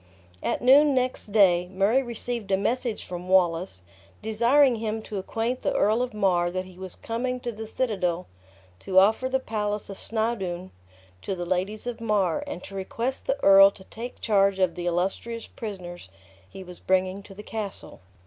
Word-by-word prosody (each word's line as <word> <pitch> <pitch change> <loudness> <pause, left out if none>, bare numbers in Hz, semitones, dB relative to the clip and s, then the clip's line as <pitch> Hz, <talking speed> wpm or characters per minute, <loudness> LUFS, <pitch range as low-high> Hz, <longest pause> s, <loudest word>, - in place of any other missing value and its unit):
At - - -2
noon 280 +3 +6
next 255 -2 -1
day 185 -4 +4
Murray 200 +7 +2
received 235 -3 -5
a 190 - +3
message 230 +3 -1
from 180 0 -7
Wallace, 175 - +2 0.4
desiring 235 +4 +4
him 220 0 -3
to 205 -2 -5
acquaint 230 +6 -2
the - - -1
Earl 215 +4 +3
of 250 0 -2
Mar 185 -5 +1
that 185 +1 -3
he 185 -1 -14
was 185 -1 -7
coming 250 +2 -3
to 240 - -3
the 220 0 -8
citadel 185 -8 -1 0.5
to 185 - -2
offer 220 +7 +5
the 265 0 +1
palace 210 -4 -3
of 195 - -9
Snawdoun 195 -5 -2 0.5
to 195 - -3
the 175 -1 -4
ladies 185 +5 -2
of 240 -2 -5
Mar, 205 -7 +1
and 180 - -6
to - - -11
request 230 +7 -3
the 270 - +1
earl 195 0 +9
to 200 -1 -14
take 235 +5 -8
charge 200 -2 +3
of 185 -3 +2
the 175 +1 -4
illustrous 195 +6 -2
prisoners 180 - -8 0.4
he 190 - -9
was 180 -1 -11
bringing 185 +1 0
to 195 -1 -13
the 210 - -9
castle. 210 - -6
200 Hz, 175 wpm, -26 LUFS, 185-230 Hz, 0.5 s, earl